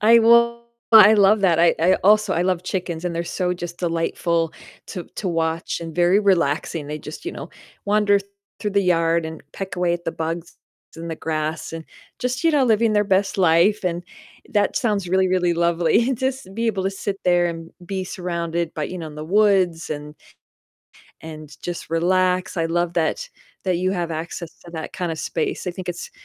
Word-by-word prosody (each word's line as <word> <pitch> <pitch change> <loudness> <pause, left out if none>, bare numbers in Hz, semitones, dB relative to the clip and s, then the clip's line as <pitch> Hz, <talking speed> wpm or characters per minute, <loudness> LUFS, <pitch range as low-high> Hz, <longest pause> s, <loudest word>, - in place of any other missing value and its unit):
I 230 +2 +7
will 235 +1 +4 0.3
I 215 -1 +9
love 205 +1 +5
that, 175 -4 +3
I 170 0 +5
I 180 +3 +5
also 210 0 +5
I 170 - +1
love 180 -1 0
chickens 180 -3 -4
and 175 -1 -2
they're 170 +1 -2
so 180 +1 -1
just 175 -1 -7
delightful 165 -1 -1 0.3
to 180 - -6
to 195 - -2
watch 165 0 -1
and 165 -1 -7
very 175 +3 +4
relaxing, 165 -5 +1
they 150 +1 -5
just, 150 - -9
you 355 - -4
know, - - -8 0.3
wander 205 0 +3 0.4
through 210 - -2
the 200 - +3
yard 165 -2 +2
and 160 0 -8
peck 190 -2 -6
away 175 -1 +1
at 175 0 -7
the 165 - -2
bugs 165 +1 -5 0.4
in 165 +1 -7
the 165 - -3
grass 155 0 -3
and 165 0 -6 0.3
just, 250 +2 -2
you 330 - +4
know, 290 -4 +3
living 225 -1 +3
their 210 0 +3
best 195 0 +1
life, 180 +4 +3
and 175 -1 -1 0.5
that 205 -1 +1
sounds 205 -7 0
really, 190 +1 +2
really 180 -1 +2
lovely, 170 +8 +2
just 260 +2 -2
to 190 - -15
be 230 +3 -2
able 200 -4 0
to 195 - +1
sit 195 0 -4
there 175 -1 +3
and 165 -1 -6
be 190 +1 -3
surrounded 170 -2 -3
by 155 - -2
you 180 - -6
know, 165 - -6
in 150 - -12
the 150 0 -6
woods 185 -3 +2
and 150 0 -6 1.1
and 155 -2 -10
just 175 -2 -6
relax, 185 +3 +1
I 165 -1 +1
love 170 +1 -1
that 170 - -1 0.4
that 185 -2 +1
you 185 +2 0
have 175 -3 -2
access 165 +1 -5
to 170 - -11
that 160 -2 -6
kinda 175 -3 -3
space, 160 +3 -3
I - - 0
think 180 0 -8
it's 175 - -5
175 Hz, 200 wpm, -22 LUFS, 165-200 Hz, 1.1 s, I